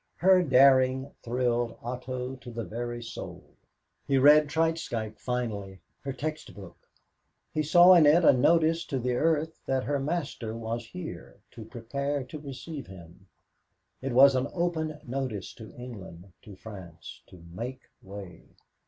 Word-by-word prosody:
Her 185 0 +5
daring 130 -2 +4
thrilled 120 -1 -1
Otto 125 +1 -5
to 125 -1 -12
the 115 -1 -5
very 120 +4 -5
soul. 115 - -8 0.6
He 135 - +2
read 150 +3 +7
Treitschke 145 -10 -1
finally. 105 -6 -4 0.2
Her 140 - -5
text 155 +4 -5
book. 95 -4 -13 0.6
He 155 - 0
saw 175 +4 +7
in 165 -4 +7
it 165 +3 +5
a - - +8
notice 165 +5 +3
to 135 - -3
the 125 0 -1
earth 160 +3 0
that 130 -1 0
her 145 -1 -1
master 135 -7 -3
was 115 +1 -4
here, 180 +3 -8 0.2
to 115 -3 -10
prepare 140 +5 -3
to 150 +4 -9
receive 140 +1 -8
him. 90 0 -14 0.7
It 135 -1 -3
was 135 +2 +7
an 130 +1 0
open 160 -3 -2
notice 125 -6 -4
to 110 -3 -12
England, 100 -7 -10
to 105 - -11
France, 90 -6 -11
to 85 -2 -15
make 125 +7 -6 0.2
way. 95 -2 -10
130 Hz, 145 wpm, -28 LUFS, 115-150 Hz, 0.7 s, a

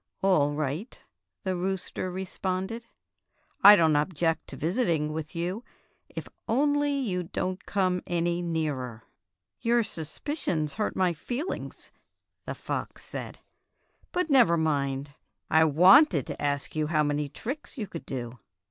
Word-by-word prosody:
"All 150 -7 +4
right," 155 - -3 0.4
the 190 -1 -1
rooster 185 0 -3
responded; 190 +4 -3 0.8
"I 205 +1 +12
don't 160 -5 +4
object 165 +1 0
to - - -8
visiting 165 -5 0
with 155 0 -5
you, 180 +7 -2 0.5
if - - -7 0.2
only 290 +4 +2
you 235 -11 -1
don't 185 +2 -3
come 185 -2 +1
any 175 0 0
nearer." 145 -9 -2 0.6
"Your 235 0 +3
suspicions 160 - -3
hurt 215 - -2
my 185 -2 +2
feelings," 250 - -5 0.6
the - - -3
Fairy - - -3
Tale - - -4
Foxes - - -17
57 - - -5
fox - - -15
said. - - -33 0.7
"But 360 -2 0
never 235 -11 +6
mind. 140 -3 -1 0.4
I 160 +1 +6
wanted 175 - +6
to - - -6
ask 145 0 -1
you 155 -1 0
how 155 -1 +2
many 145 0 -1
tricks 270 - -6
you 220 - -2
could 170 -4 -9
do." 120 -2 -5
175 Hz, 145 wpm, -28 LUFS, 150-205 Hz, 0.8 s, I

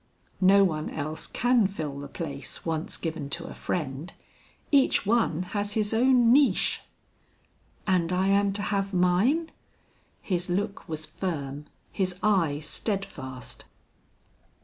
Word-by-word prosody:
"No 195 +2 +7
one 155 -5 0
else 155 +1 -4
can 245 -4 +3
fill 155 -8 -5
the 145 - -6
place 140 -2 -6
once 160 -1 -2
given 160 -4 -4
to 165 +4 -4
a - - -7
friend. 150 0 -3 0.6
Each 275 -7 +4
one 205 -6 +2
has 205 0 -1
his 215 0 0
own 245 0 +5
niche." 285 0 +3 1.0
"And 180 -3 +2
I 185 +2 +2
am 200 0 +3
to 205 +1 -2
have 195 -1 -1
mine?" 200 - +2 0.7
His 180 -2 -2
look 195 +1 -2
was 155 -1 -3
firm, 145 -6 -4 0.3
his 185 -2 -1
eye 170 -9 +2
steadfast. 155 - -4
185 Hz, 125 wpm, -27 LUFS, 155-205 Hz, 1.0 s, No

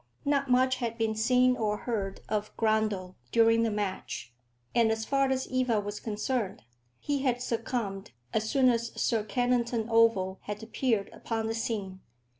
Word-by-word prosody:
Not 280 -1 +1
much 255 +1 +4
had 230 -2 -3
been 225 -1 +1
seen 250 +3 +3
or 210 -3 0
heard 200 -5 -3
of 210 0 -3
Grundle 215 -4 +1 0.2
during 230 0 +5
the 230 - +2
match, 190 - -4 0.4
and 230 -2 +4
as 220 0 -1
far 275 +1 +2
as 260 0 0
Eva 255 -4 +1
was 205 0 -5
concerned, 215 -1 -2 0.4
he 290 -1 -1
had 250 -3 +1
succumbed 230 -5 -3 0.2
as 220 0 0
soon 265 -2 +4
as 235 -1 -1
Sir 225 -3 +1
Kennington 235 0 0
Oval 225 -5 +3
had 210 +1 -5
appeared 225 -2 0
upon 225 -1 -3
the 225 - -1
scene. 205 -5 -3
225 Hz, 160 wpm, -29 LUFS, 210-250 Hz, 0.4 s, during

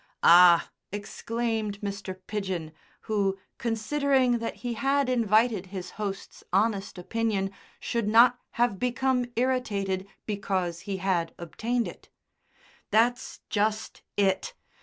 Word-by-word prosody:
"Ah!" 175 0 +7 0.2
exclaimed 220 +1 -3
Mr. 200 -2 -5
Pidgen, 190 -7 -3 0.3
who, 200 -3 0 0.2
considering 255 +1 +1
that 230 - -4
he 240 - -1
had 275 +3 +1
invited 220 -4 +2
his 185 -1 -7
host's 200 -2 -6
honest 200 0 +1
opinion, 200 0 -1 0.3
should 235 -3 -2
not 235 +3 +6
have 235 -5 +1
become 250 0 +1
irritated 205 -7 0 0.2
because 190 -5 -2
he 195 - -1
had 180 -3 -1
obtained 230 +8 -2
it; - - -11 0.8
"that's 240 +4 +1
just 215 +1 -1 0.2
it. 200 - +1
215 Hz, 110 wpm, -27 LUFS, 195-240 Hz, 0.8 s, Ah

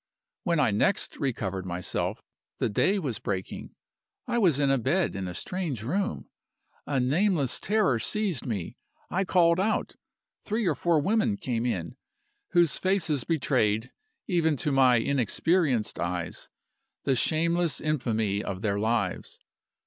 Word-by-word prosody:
"When 170 -3 0
I 145 - +3
next 110 - +1
recovered 100 -8 -2
myself, 90 -1 -3 0.3
the - - 0
day 190 - +2
was 140 - -2
breaking. 95 -2 -5 0.5
I 240 -1 0
was 175 - +4
in 140 -1 +2
a 135 - +2
bed 155 +9 +1
in 95 -1 -3
a 90 - -6
strange 165 - -3
room. 195 - -2 0.6
A 140 -2 0
nameless 145 - +2
terror 200 - +2
seized 195 - 0
me. 100 -8 -4 0.3
I 190 +2 0
called 170 -2 +3
out. 215 +3 -1 0.5
Three 215 +1 -1
or 170 - +3
four 165 +3 +2
women 215 +6 +1
came 125 - -2
in, 125 +1 -3 0.5
whose 170 -3 +3
faces 170 -9 +1
betrayed, 125 -7 +1 0.3
even 160 -5 +1
to 150 - -1
my 130 -2 +5
inexperienced 140 - +1
eyes, 85 0 -3 0.5
the 135 - +2
shameless 170 +4 +1
infamy 110 -9 -1
of 95 +1 -5
their 100 -2 0
lives. 110 -3 -1
140 Hz, 140 wpm, -27 LUFS, 110-175 Hz, 0.6 s, my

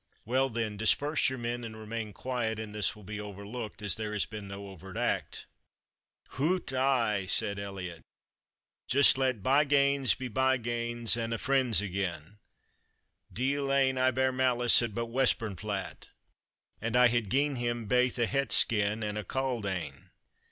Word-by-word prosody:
"Well, 130 +3 +1
then, 110 -3 -3
disperse 145 +8 +2
your 130 - -5
men, 120 0 -3
and 110 -1 -7
remain 110 0 -5
quiet, 115 0 -3
and 110 -1 -6
this 105 -3 0
will 105 - -14
be 105 +2 -6
overlooked, 105 +2 -7
as 105 - +1
there 110 -1 -4
has 105 - 0
been 105 -2 -8
no 100 0 -8
overt 95 0 -10
act." - - -2 0.8
"Hout, 155 +2 -1
ay," 120 -7 +1
said 100 -1 +3
Elliot, 95 -4 -6 0.9
"just 140 +1 +5
let 130 -6 0
byganes 140 0 +3
be 130 - -4
byganes, 120 -2 0
and 115 -1 -2
a' - - -3
friends 125 -1 +2
again; 95 -1 -4 0.9
deil 135 +3 -1
ane 135 -1 +2
I 130 0 +4
bear 130 +1 +1
malice 125 -2 +3
at 115 -4 -3
but 115 - -1
Westburnflat, 110 -5 -1 0.7
and 115 +2 -2
I 125 0 +7
hae 120 0 +1
gien 135 +7 0
him 120 -1 -2
baith 125 +3 +2
a 120 - +2
het 135 -1 -1
skin 105 0 +3
and 105 0 -3
a - - -4
cauld 125 -1 -2
ane. 95 -3 -5
115 Hz, 160 wpm, -30 LUFS, 105-130 Hz, 0.9 s, I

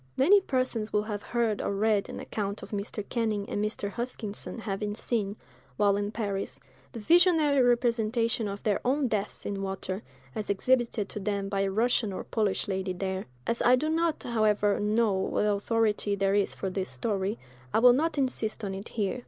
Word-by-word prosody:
Many 390 +10 +6
persons 255 - -1
will 210 0 +2
have 210 -1 -4
heard 230 -2 0
or 200 - -1
read 210 0 +1
an - - -6
account 200 -1 -4
of - - -10
Mr. 205 0 -4
Canning 220 -4 -1
and 205 - -2
Mr. 210 -1 -2
Huskisson 230 -1 -5
having 210 -1 -3
seen, 210 -3 -2 0.4
while 205 -1 +4
in 205 0 -1
Paris, 205 -3 -3 0.3
the 230 - -7
visionary 320 - +4
representation 235 -2 +2
of 200 0 -6
their 210 -2 +1
own 270 +2 +2
deaths 210 -3 -2
in 200 -1 -3
water, 190 0 -3 0.3
as 215 -2 -4
exhibited 230 0 +1
to - - -5
them 200 -1 -2
by 195 -1 0
a 195 - +1
Russian 225 +1 +1
or 185 - -5
Polish 215 -2 -1
lady 190 -1 -2
there: 190 +1 -3 0.2
as 230 - -1
I 245 - +6
do 300 +5 -1
not, 330 0 0
however, 210 -3 +2
know 215 +1 +2
what 190 +2 0
authority 210 0 +1
there 195 0 +1
is 205 -1 +1
for 190 - -3
this 190 0 -3
story, 195 - -2 0.3
I - - +2
will 245 +2 +7
not 315 +5 0
insist 250 -5 -1
on 195 -1 -2
it 195 +3 -7
here. 210 +2 -1
210 Hz, 185 wpm, -28 LUFS, 200-235 Hz, 0.4 s, will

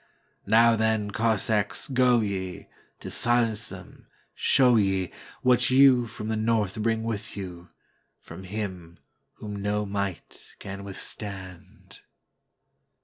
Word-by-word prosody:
Now, 115 +2 +5
then, 110 -2 0
Cossacks, 110 -1 0
go 125 -3 +3
ye, 95 -3 -4 0.4
To - - -7
silence 120 -3 +1
them, - - -12 0.3
show 125 -2 +4
yeWhat 105 +5 +1
you 130 -2 +5
from 110 -1 -7
the 110 - -1
north 110 -2 0
bring 115 0 0
with 110 -2 -5
you, 90 -3 -8 0.5
From 95 - -11
Him 95 -4 -6 0.4
whom 105 -1 -8
no 105 +1 -1
might 100 -3 -5
can 100 0 -8
withstand!" 95 -2 -8
105 Hz, 110 wpm, -26 LUFS, 95-115 Hz, 0.5 s, Now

